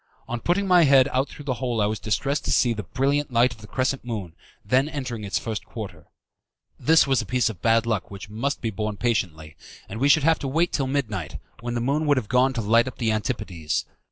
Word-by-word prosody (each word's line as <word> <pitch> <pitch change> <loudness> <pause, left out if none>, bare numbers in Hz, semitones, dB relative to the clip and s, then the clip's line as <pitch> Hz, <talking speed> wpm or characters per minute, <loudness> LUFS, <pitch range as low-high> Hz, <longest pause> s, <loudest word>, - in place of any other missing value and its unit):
On 120 - -3
putting 190 +8 0
my 180 -2 +6
head 135 -2 +6
out 130 +2 0
through 145 - -11
the 135 - 0
hole 120 -3 -1
I 105 - +3
was 105 0 -2
distressed 140 +6 -1
to - - 0
see 120 -2 +3
the 110 - -4
brilliant 140 +5 -1
light 120 +1 +3
of 110 - -17
the 105 - -11
crescent 130 +3 -1
moon 105 -8 -5 0.3
then 130 +7 +2
entering 130 -7 -4
in 105 - -5
its 100 - 0
first 110 -2 -4
quarter. 95 -9 -9 0.7
This 160 +1 +5
was 135 -3 +2
a - - -7
piece 125 0 +1
of 95 -6 -9
bad 115 +1 +3
luck 110 -4 -1
which 100 0 -9
must 115 +7 -3
be 115 - -2
borne 105 0 -3
patiently, 85 -10 -2 0.3
and 110 - -7
we 140 +3 +3
should 145 0 +5
have 160 +1 +3
to 140 - -4
wait 165 +6 +1
till 135 -3 0
midnight, 110 - -2 0.2
when 120 +1 -4
the 120 - -1
moon 145 +5 0
would 145 -2 +4
have 115 -5 -2
gone 125 +2 +3
to 120 - -2
light 115 +3 +3
up 130 - -7
the 115 -3 0
Antipodes. 90 - -2
120 Hz, 240 wpm, -24 LUFS, 105-135 Hz, 0.7 s, my